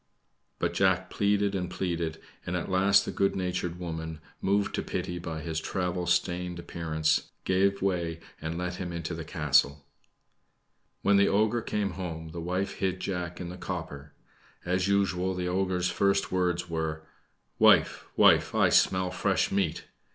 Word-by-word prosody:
But - - -1
Jack 95 -1 +2
pleaded 100 0 +1
and 90 -2 -2
pleaded, 85 -3 -2 0.2
and 90 - -3
at 90 - -4
last 100 +2 +4
the - - -3
good 100 - +1
natured 90 -2 -2
woman, 80 -2 -5 0.2
moved 100 +1 +1
to - - -1
pity 90 0 -4
by 80 -2 -5
his 80 -1 -3
travel 90 -1 -2
stained 90 0 0
appearance, 80 -2 -1
gave 100 +1 +2
way 85 -4 -1 0.2
and 80 +1 -3
let 90 0 -3
him 90 -2 -4
into 85 0 -4
the 80 0 -5
castle. 70 -3 +2 1.2
When 100 0 +5
the 100 - +5
ogre 110 +4 +2
came 105 -3 -1
home, 80 -3 -6
the 85 +1 -6
wife 90 +3 -2
hid 95 -1 0
Jack 90 -2 -4
in 90 - -5
the 90 - -8
copper. 80 -6 -6 0.5
As 90 +1 +1
usual, 95 -2 +1
the 90 0 -2
ogre's 90 -1 0
first 100 0 +1
words 90 -1 0
were: 80 -1 -3 0.6
"Wife, - - +5
wife, - - +5
I - - +4
smell 95 -1 +3
fresh - - +1
meat!" 95 -5 0
90 Hz, 160 wpm, -28 LUFS, 85-95 Hz, 1.2 s, When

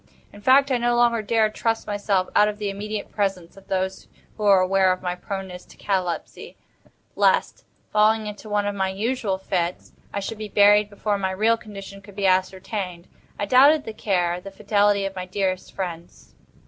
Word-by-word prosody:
In 205 - -13
fact, 270 +4 +5
I 250 - +2
no 240 0 +1
longer 240 -1 +3
dared 215 0 +1
trust 225 -1 -1
myself 205 -2 0
out 210 - +6
of 210 0 -3
the 205 -2 -3
immediate 210 +1 -5
presence 195 -5 -2
of 195 - -17
those 190 0 -2 0.3
who - - -11
were 200 -2 +6
aware 190 0 +3
of 185 - -3
my 180 -1 -1
proneness 190 0 -6
to - - -18
catalepsy, 185 -4 -3 0.6
lest, - - +1 0.3
falling 215 +1 +3
into 210 +1 -8
one 205 0 0
of 205 - -1
my 190 -1 -1
usual 210 0 -1
fits, 180 -2 -3 0.2
I 200 - -3
should 210 +2 -5
be 215 -1 -6
buried 205 +1 +5
before 205 0 -2
my 190 -1 -1
real 215 +5 +2
condition 195 -3 -10
could 200 0 -15
be 200 -1 -2
ascertained. 185 -1 -1 0.3
I 205 - -2
doubted 280 +7 +5
the 220 - -7
care, 180 -4 -1
the 195 - -8
fidelity 205 0 +1
of 195 0 -5
my 185 -1 -5
dearest 185 -1 -2
friends. 175 -3 -7
200 Hz, 185 wpm, -23 LUFS, 190-215 Hz, 0.6 s, out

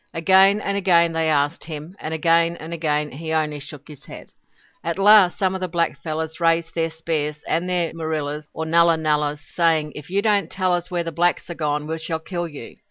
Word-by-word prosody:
Again 190 +4 +5
and 200 - -2
again 170 -4 +3
they 160 -1 +1
asked 145 +1 0
him, 155 +3 -7
and 155 - -5
again 165 +1 +2
and 160 +2 -7
again 150 -2 -1
he 160 +4 -6
only 155 -2 0
shook 145 0 -11
his 150 -3 -13
head. - - -11 0.5
At 170 +1 -2
last 200 -2 +6
some 190 -2 +1
of 190 - -5
the 185 - -1
black 170 -1 -1
fellows 160 0 -4
raised 165 -1 +1
their 165 -1 0
spears 155 -2 -3
and 170 +3 -1
their 175 -2 0
moorillahs 155 -2 -4
or 160 - -5
nullah 170 +1 +4
nullahs, 150 -1 0
saying: 160 -3 0
"If 150 +1 -10
you 200 +2 0
do 220 - +2
not 200 -5 +1
tell 185 -2 0
us 175 0 -2
where 175 -2 -1
the 165 - -5
blacks 175 +2 0
are - - -3
gone, 150 -2 -2
we 160 +1 -4
shall 160 0 -3
kill 175 +1 -4
you." 145 -7 -11
165 Hz, 220 wpm, -22 LUFS, 155-175 Hz, 0.5 s, last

